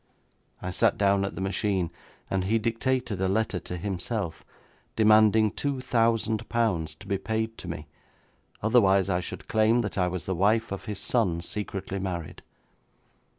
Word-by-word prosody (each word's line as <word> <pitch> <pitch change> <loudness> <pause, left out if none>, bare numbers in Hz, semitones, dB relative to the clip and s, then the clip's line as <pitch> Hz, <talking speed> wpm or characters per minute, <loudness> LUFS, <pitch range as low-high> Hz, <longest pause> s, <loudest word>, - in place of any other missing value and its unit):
I 90 - -2
sat 95 - +2
down 100 -2 +3
at 100 - -5
the - - -5
machine, 95 -2 0 0.4
and 95 -1 -1
he 110 +4 +2
dictated 115 -1 -1
a 95 - +2
letter 100 -1 0
to 90 +1 -6
himself, 95 -1 -3 0.5
demanding 110 0 +5
two 140 +2 -2
thousand 115 -3 +1
pounds 90 -10 0
to - - -14
be 100 -1 -1
paid 110 +2 -2
to - - -6
me, 80 -2 -5 0.8
otherwise 100 -4 +4
I 90 -2 +2
should 90 - -7
claim 110 +2 +3
that 100 -3 -3
I 90 - +3
was 90 -2 -4
the 95 - -1
wife 105 +5 +2
of 100 - -5
his 105 -3 -4
son, 95 -9 +1
secretly 100 +1 -4
married. 90 -4 -5
100 Hz, 160 wpm, -27 LUFS, 95-110 Hz, 0.8 s, demanding